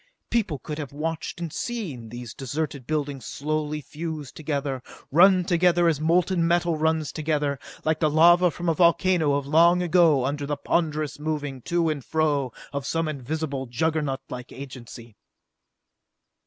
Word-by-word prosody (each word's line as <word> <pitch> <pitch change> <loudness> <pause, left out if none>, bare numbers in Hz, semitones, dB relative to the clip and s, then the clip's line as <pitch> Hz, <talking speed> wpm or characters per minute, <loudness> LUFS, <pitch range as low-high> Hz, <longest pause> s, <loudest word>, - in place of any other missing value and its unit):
People 210 -10 0
could 150 +3 -6
have 145 -4 -5
watched 160 +3 -4
and 170 -3 -5
seen 165 - -4
these 120 -1 -8
deserted 140 0 -4
buildings 145 -4 -2
slowly 150 +3 -3
fuse 155 -1 -6
together, 140 -4 -3 0.3
run 180 +3 +6
together 175 -1 +3
as 155 -3 +1
molten 170 +1 +2
metal 170 -1 +2
runs 160 -1 0
together, 150 -3 -1 0.3
like 155 0 +1
the 155 - +3
lava 175 +4 +6
from 175 +2 -6
a 165 - +4
volcano 170 -2 +3
of 140 -1 -1
long 170 +4 +4
ago 165 -6 +4
under 145 +1 -2
the 145 0 -2
ponderous 155 -1 -1
moving 145 -4 -3
to 170 +5 0
and 150 -4 -2
fro 145 -4 0 0.2
of 140 -1 -3
some 165 0 0
invisible, 140 -1 -3
juggernautlike 135 -2 -2
agency. 120 -4 -10
155 Hz, 145 wpm, -25 LUFS, 140-165 Hz, 0.3 s, run